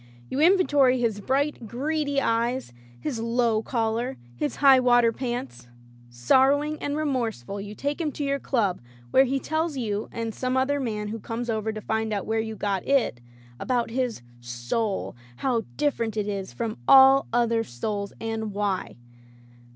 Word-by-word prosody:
You 270 - -2
inventory 290 -7 +4
his 225 -4 0
bright, 270 +1 -1
greedy 285 +4 -1
eyes, 235 - 0 0.3
his 230 - -3
low 230 -1 +1
collar, 225 - -1 0.2
his 145 +5 -2
high 275 -2 +6
water 245 -2 +4
pants. 220 - -5 0.4
Sorrowing 270 - +2
and 285 +1 -2
remorseful 230 - -2
you 205 +1 -8
take 285 +7 -2
him 305 -3 -1
to 295 - -4
your 280 0 0
club, 210 -11 0 0.3
where 265 - +6
he 270 +1 0
tells 315 +1 -2
you, 215 -4 -2
and 230 -1 -4
some 255 +2 -1
other 280 +2 +1
man 210 -5 -3
who 225 +1 -5
comes 230 +2 -4
over 220 0 -1
to 215 0 -6
find 220 0 -1
out 200 - -2
where 220 0 0
you 220 0 -3
got 200 -3 -2
It, 270 - +1 0.4
about 240 -3 -1
his 245 - -2 0.2
Soul, 120 - -3 0.2
how 235 - -1
dif 295 -1 +1
ferent 220 -2 -2
it 210 -1 -1
is 195 -2 -4
from 230 -2 -4
all 270 0 +7
other 230 -1 +2
souls, 200 - -4
and 220 -2 -3
why. 200 -2 -2
230 Hz, 165 wpm, -25 LUFS, 215-270 Hz, 0.4 s, all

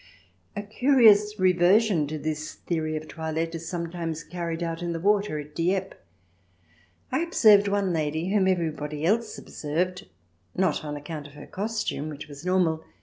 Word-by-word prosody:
A 205 - -3
curious 215 -2 +4
reversion 185 -1 +4
to 155 +2 -4
this 155 0 -4
theory 155 -2 -2
of 155 0 -7
toilette 160 0 -3
is 165 0 -6
sometimes 170 -2 -4
carried 170 0 -4
out 165 0 -3
in 175 -1 -2
the 165 - -3
water 200 -2 +2
at 150 0 -8
Dieppe. 185 +4 -1 1.2
I - - +1
observed 215 -12 +5
one 200 -2 +1
lady, 160 +2 -1
whom 195 -1 +3
everybody 155 -4 -1
else 225 +5 +1
observed, 175 - -3 0.5
not 180 -5 +1
on 150 -1 -4
account 145 0 -7
of 145 - -16
her - - -10
costume, 210 -7 -3
which 150 0 -8
was 145 0 -11
normal, 180 -3 +2
CH. - - -20
170 Hz, 160 wpm, -26 LUFS, 155-195 Hz, 1.2 s, observed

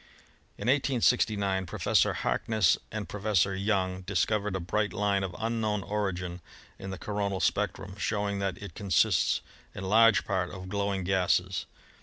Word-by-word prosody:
In - - -5
1869 110 -8 +2
Professor - - +2
Harkness 110 -6 +2 0.2
and 105 -2 -4
Professor 100 -2 +1
Young 95 -2 0
dis 95 0 +1
covered 105 -2 -1
a - - -1
bright 105 +4 -1
line 100 -1 +1
of 90 -2 -4
unknown 110 -3 -1
origin 95 -4 -3 0.4
in 95 - -6
the 95 - -5
coronal 100 -1 -2
spectrum, 95 -1 -1
showing 100 -2 -1
that 95 -2 -2
it 100 -5 -9
consists 100 +1 +2 0.3
in 100 - -6
large 110 +2 +5
part 90 -1 -1
of 95 -1 -8
glowing 100 -1 -1
gases. 90 -3 +1
100 Hz, 145 wpm, -29 LUFS, 95-105 Hz, 0.4 s, large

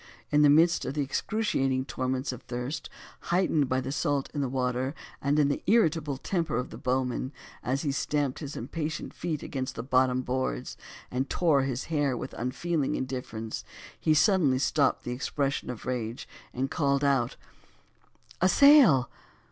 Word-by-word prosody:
In 150 0 +4
the 145 - +7
midst 165 +3 +5
of 140 - -4
the 145 - +1
excruciating 135 -5 0
torments 130 0 -2
of 125 -1 -8
thirst, 125 +5 -5 0.4
heightened 170 -6 +2
by 130 - +1
the 130 - -4
salt 145 -1 -1
water, 130 -1 -1 0.3
and 140 +1 +1
the 145 -1 +2
irritable 160 - +2
temper 165 - -1
of 125 - -3
the - - -8
bowman, 130 0 -1 0.3
as 135 +4 -1
he 145 - 0
stamped 140 -1 -1
his 145 -2 -6
impatient 155 +5 -4
feet 160 -4 -3
against 130 -2 -4
the 115 - -4
bottom 130 0 +2
boards, 125 - -2 0.4
and 130 +2 -1
tore 160 -6 +3
his 135 -1 -2
hair 145 -5 0
with - - -6
unfeeling 140 +4 -1
indifference, 125 -4 -4 0.4
he 155 - +3
suddenly 155 -7 +4
stopped 140 +2 +1
the 120 - -4
expression 140 +2 -2
of 125 -3 -6
rage 120 -2 -3 0.2
and 135 +2 -2
called 140 -3 +1
out 135 -4 +2 1.1
"a 185 - +5
sail!" 260 - +7
135 Hz, 155 wpm, -28 LUFS, 130-150 Hz, 1.1 s, the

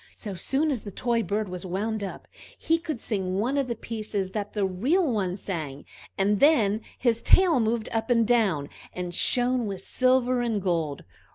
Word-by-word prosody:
So 205 -3 -6
soon 275 - 0
as 250 -6 -2
the 205 - -7
toy 235 +3 0
bird 210 +1 -1
was 180 -1 -6
wound 205 +4 -2
up, 195 - -7 0.3
he 330 +1 +1
could 315 -7 -4
sing 190 -5 -2
one 240 +7 0
of 275 -2 +1
the 235 - -2
pieces 215 -4 -4
that 205 -1 -4
the 205 -2 +1
real 255 - +1
one 200 - -1
sang, 155 -9 -5 0.3
and 200 +1 +2
then 225 -9 +4 0.2
his 235 -2 +1
tail 360 -7 +5
moved 225 0 0
up 225 +2 -2
and 230 -2 +3
down, 200 -12 +2 0.2
and 180 -1 -5
shone 245 +3 +2
with 195 -2 -5
silver 255 -1 +2
and 230 -3 0
gold. 165 -6 -1
220 Hz, 185 wpm, -26 LUFS, 190-245 Hz, 0.3 s, tail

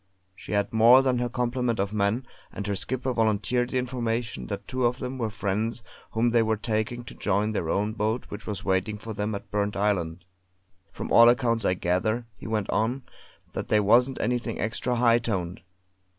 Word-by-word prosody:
She - - -8
had 100 +1 0
more 120 +4 +7
than 130 -2 +1
her 120 0 -1
complement 125 -1 -1
of 100 +1 -1
men, 105 +5 0 0.3
and 100 - -5
her 100 -1 -1
skipper 130 +5 -2
volunteered 115 +2 +1
the 130 - -1
information 115 - -2
that - - -5
two 130 0 -2
of 120 +1 -2
them 130 0 -5
were 115 -2 -1
friends 105 +3 -2 0.3
whom 115 +2 +2
they 120 0 +4
were 110 -1 +1
taking 110 +2 -2
to - - -10
join 105 +1 0
their 85 -6 -2
own 105 +4 0
boat 110 +2 -1
which 105 0 -8
was 105 -2 -4
waiting 95 +2 0
for 110 +1 -7
them 105 +1 -2
at 100 - -9
Burnt 105 0 -1
Island. 90 -4 -1 0.7
From - - -6
all 115 0 +8
accounts 120 -2 +2
I 90 - +2
gather," 110 +7 0
he - - -10
went 110 -2 -1
on, 120 +6 0 0.5
"that - - -4
they 105 - +3
wasn't 120 +6 +3
anything 120 0 -1
extra 115 +3 -1
high 120 -1 +4
toned. 95 -7 -3
110 Hz, 195 wpm, -26 LUFS, 105-120 Hz, 0.7 s, all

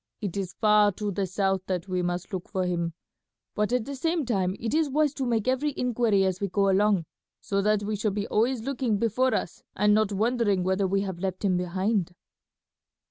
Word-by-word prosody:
It 200 -3 -4
is 190 -3 -3
far 210 -1 +4
to 205 +2 -3
the 195 0 -1
south 195 0 0
that 185 0 -2
we 185 -1 -1
must 175 +3 -3
look 185 -2 -4
for 185 -1 -1
him; 170 -2 -1 0.6
but 210 +2 0
at 250 -3 +1
the 280 +1 -5
same 325 +2 -1
time 190 -6 0
it 230 +2 -3
is 315 -1 +2
wise 295 +1 +2
to 270 -3 -3
make 230 -2 0
every 260 +3 0
inquiry 230 -5 +2
as 185 0 -1
we 200 - 0
go 195 +1 +2
along, 200 -3 +2 0.3
so 200 0 -1
that 210 0 +2
we 210 +1 -2
shall 210 +1 0
be 205 0 -2
always 230 +2 +1
looking 250 -4 -1
before 235 +4 +1
us - - -4
and 210 +1 +3
not 215 -1 +2
wondering 210 -2 +1
whether 190 +1 +1
we 195 +1 +1
have 190 -3 -4
left 190 +1 -3
him 185 -2 +2
behind." 180 +1 -1
205 Hz, 210 wpm, -27 LUFS, 190-230 Hz, 0.6 s, far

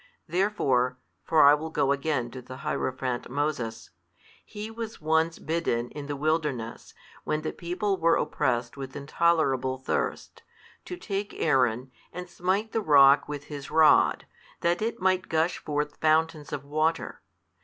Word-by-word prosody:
Therefore 155 -10 +1 0.3
(for 160 -1 +4
I 140 +1 +8
will 155 +2 -2
go 140 -3 +1
again 140 -4 -1
to 130 - -8
the 130 +1 -10
hierophant 130 -4 -2
Moses) 125 -6 -3 0.5
he 215 +1 -8
was 225 0 -7
once 160 +1 +1
bidden, 155 -8 -2
in 145 -1 -7
the 145 - -3
wilderness, 150 -6 -2 0.3
when 155 0 -2
the 155 - -2
people 190 +3 -2
were 165 -1 +3
oppressed 120 -4 -1
with 135 -1 -8
intolerable 140 -3 +1
thirst, 130 - -3 0.4
to 360 - -6
take 200 - -4
Aaron, 130 -3 +1 0.2
and 180 0 -7
smite 190 +5 -1
the 225 - 0
rock 140 -5 +6
with 145 -1 -5
his 145 -2 -8
rod, 160 -1 +4 0.4
that 170 +2 +1
it 225 +2 -2
might 185 0 +1
gush 160 +2 +1
forth 150 0 -3
fountains 155 -1 +1
of 145 -1 -5
water. 155 +3 -1
150 Hz, 145 wpm, -27 LUFS, 135-170 Hz, 0.5 s, I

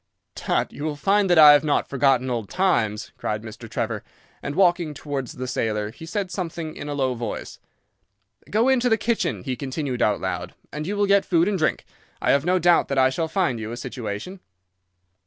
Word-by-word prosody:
"'Tut, - - -1
you 145 - -7
will 155 -1 -2
find 195 +5 +2
that 175 - +4
I 150 -2 +10
have 145 0 +4
not 150 -2 +1
forgotten 135 -2 +2
old 115 -4 -3
times,' 120 - 0
cried 105 0 -3
Mr. 115 +1 -10
Trevor, - - -3 0.4
and, 145 - -4
walking 175 -4 +2
towards 140 -3 -4
the 130 - -5
sailor, 105 -3 -1
he 160 +8 -11
said 190 +1 -3
something 170 -3 -4
in 145 - -7
a 145 - -3
low 130 -2 0
voice. 115 -3 -6 0.9
'Go 225 +4 +2
into 255 -2 +3
the 225 - +3
kitchen,' 235 +1 -1
he 130 -2 -2
continued 135 -1 -4
out 105 -1 +2
loud, 90 -1 -4 0.2
'and 150 +1 -4
you 205 +1 -2
will 205 - +3
get 200 0 +4
food 170 0 +2
and 200 -3 0
drink. - - 0 0.3
I - - +2
have 140 0 +3
no 180 +1 +3
doubt 175 -1 +4
that 140 - -2
I 130 0 +4
shall 160 +4 -1
find 170 - 0
you 110 0 -5
a 120 - -5
situation. 120 - -6
145 Hz, 205 wpm, -23 LUFS, 120-180 Hz, 0.9 s, I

